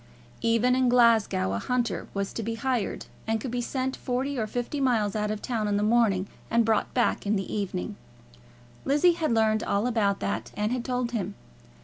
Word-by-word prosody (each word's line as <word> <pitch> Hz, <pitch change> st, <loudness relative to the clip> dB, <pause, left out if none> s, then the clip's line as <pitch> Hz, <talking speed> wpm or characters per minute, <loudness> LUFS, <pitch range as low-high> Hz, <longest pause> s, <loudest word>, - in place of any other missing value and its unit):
Even 230 Hz, +2 st, +3 dB
in 255 Hz, -1 st, +3 dB
Glasgow 225 Hz, -, +4 dB
a 100 Hz, -, -1 dB
hunter 240 Hz, -, -1 dB
was 200 Hz, 0 st, -2 dB
to -, -, -3 dB
be 225 Hz, +1 st, -3 dB
hired, 245 Hz, -2 st, -2 dB, 0.2 s
and 225 Hz, 0 st, +1 dB
could 240 Hz, +2 st, -5 dB
be 245 Hz, 0 st, -1 dB
sent 260 Hz, +2 st, -2 dB
forty 265 Hz, +2 st, -2 dB
or 220 Hz, -4 st, -1 dB
fifty 245 Hz, +5 st, -3 dB
miles 220 Hz, -6 st, +1 dB
out 210 Hz, 0 st, 0 dB
of 215 Hz, -1 st, -3 dB
the -, -, -5 dB
town 225 Hz, -4 st, -1 dB
in 205 Hz, 0 st, +1 dB
the 205 Hz, -, +1 dB
morning 210 Hz, -4 st, +3 dB, 0.2 s
and 230 Hz, 0 st, +3 dB
brought 220 Hz, -1 st, +1 dB
back 240 Hz, -4 st, +1 dB
in 210 Hz, -, +2 dB
the 195 Hz, -2 st, -3 dB
evening. 200 Hz, 0 st, -3 dB, 0.9 s
Lizzie 295 Hz, +6 st, +4 dB
had 325 Hz, -4 st, -1 dB
learned 220 Hz, -1 st, +3 dB
all 200 Hz, +3 st, 0 dB
about 215 Hz, -5 st, +1 dB
that, 200 Hz, -, -3 dB
and 210 Hz, +2 st, 0 dB
had 250 Hz, -1 st, -1 dB
told 250 Hz, -1 st, -1 dB
him. 205 Hz, -4 st, -3 dB
230 Hz, 205 wpm, -27 LUFS, 210-250 Hz, 0.9 s, Glasgow